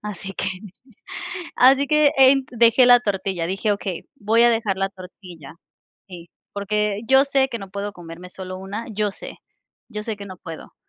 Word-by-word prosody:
Así 195 -2 -7
que - - -3 1.1
Así 270 +2 +5
que 300 -1 +4
ent 265 0 +5
Dejé 235 +1 +5
la 245 0 +8
tortilla, 195 -5 -2
dije: 195 +4 -1
"Okey, 195 -3 -5
voy 225 +1 +2
a 240 - +6
dejar 225 -4 0
la 195 0 -1
tortilla". 180 -5 -13 0.5
Sí, 175 -2 -11 0.2
porque 210 0 -1
yo 265 +1 +5
sé 270 -1 +2
que 235 - -5
no 195 -1 -9
puedo 200 +1 -5
comerme 175 +1 -11
solo 185 0 -8
1, 200 +4 -6
yo 210 -1 -1
sé, - - -10 0.5
yo 210 -3 -6
sé 220 -1 -4
que 200 - -9
no 185 -1 -9
puedo. 165 -2 -10
205 Hz, 175 wpm, -22 LUFS, 190-235 Hz, 1.1 s, la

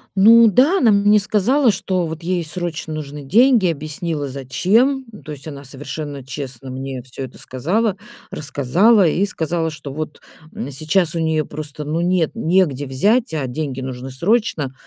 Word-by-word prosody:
Ну 225 +4 +7
да, 280 - +4
она 230 -5 +5
мне 205 +1 +4
сказала, 220 +5 +2
что 185 -2 -1
вот 160 +1 -7
ей 175 -1 -1
срочно 160 -1 -4
нужны 145 -1 -7
деньги. 230 - +4
Oбъяснила 155 0 -4
зачем. 205 - +1
Ну 210 - -13
то 155 - -8
есть 145 +1 -8
она 140 -2 -8
совершенно 140 +1 -7
честно 135 -1 -7
мне 130 -1 -5
всё 130 +1 -8
это 125 - -13
сказала, 190 - -1 0.4
рассказала 165 - +3
и 185 +6 +1
сказала, 165 -2 -2
что 145 -3 -8
вот, 155 0 -6 0.3
м, 140 - -5
сейчас 155 +4 0
у - - -1
неё 160 -1 0
просто, 150 -1 -7
ну, 160 +3 -1
нет, 175 -2 +1
негде 160 -5 +1
взять, 205 - +1
а 145 -4 -1
деньги 135 0 -4
нужны 130 0 -6
срочно. 170 - 0
160 Hz, 165 wpm, -19 LUFS, 140-200 Hz, 0.4 s, Ну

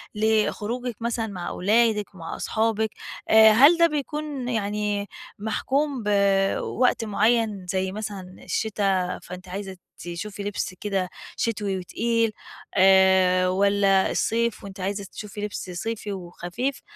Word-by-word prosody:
لخروجِك 220 +3 0
مثلًا 230 -1 -1
مع 185 -4 -6
أولادِك 210 0 +1
ومع 165 -3 -6
أصحابِك، 220 0 0 0.4
آآ 220 0 +8
هل 280 +10 +7
ده 335 0 +6
بيكون 295 -3 -4
يعني 210 -2 -1 0.3
محكوم 265 +5 -1
بوقت 200 +4 +2
معيّن 215 -2 +1
زي 190 +1 -1
مثلًا 195 -3 -6
الشتا، 195 -4 -1
فأنتِ 180 +1 -9
عايزة 190 0 -6 0.2
تشوفي 195 +4 -6
لبس 205 -2 -3
كده 195 -3 -1 0.3
شتوي 205 -4 -1
وتقيل، 230 +5 0 0.5
آآ 190 -1 +5
والّا 195 0 +3
الصيف 235 0 0
وأنتِ 200 0 -9
عايزة 200 +2 -2
تشوفي 210 -1 -8
لبس 210 -2 -5
صيفي 210 +3 -4
وخفيف، 185 +8 -4
205 Hz, 115 wpm, -24 LUFS, 190-225 Hz, 0.5 s, آآ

